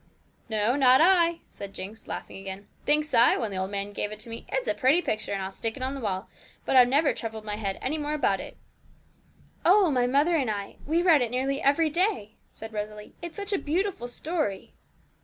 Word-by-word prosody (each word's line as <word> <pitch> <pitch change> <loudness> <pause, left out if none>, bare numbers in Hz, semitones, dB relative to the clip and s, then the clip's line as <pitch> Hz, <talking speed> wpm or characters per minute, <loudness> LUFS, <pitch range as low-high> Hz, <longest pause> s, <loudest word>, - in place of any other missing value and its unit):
'No, 220 +3 +1
not 260 -2 +6
I,' 340 -1 +4
said 200 0 -9
Jinx, 205 +4 -9
laughing - - -6
again; 195 +1 -8 0.2
'thinks 300 +1 +2
I, 230 +1 +6
when 225 -4 -2
the 190 - -4
old 190 0 -2
man 200 0 -3
gave 210 - -2
it 215 - -7
to 230 - -8
me, 230 - -8
it's - - -2
a - - +2
pretty 280 +3 +3
picture, 215 -11 -2
and 195 -1 -2
I'll 190 - -5
stick 225 +4 -3
it 255 - -5
on 260 +1 -2
the 275 - -6
wall; 195 -2 -3 0.4
but - - 0
I've 250 -1 +8
never 285 +4 +3
troubled 220 -1 -6
my 210 -1 -3
head 200 -3 -3
any 305 +4 -1
more 300 0 -2
about 205 -10 +1
it.' - - -9 1.1
'Oh, 375 -1 +5
my 250 -2 +2
mother 290 +7 +3
and 270 -7 +1
I 200 -2 -4
we 330 +3 +2
read 325 -6 +5
it 240 - 0
nearly 265 +3 -1
every 305 +3 +3
day,' 340 - 0 0.2
said 220 0 -10
Rosalie; 210 0 -6
'it's 345 +2 -7
such 405 0 -4
a 390 - +1
beautiful 340 -4 -1
story!' 295 - -3
255 Hz, 220 wpm, -27 LUFS, 210-310 Hz, 1.1 s, I've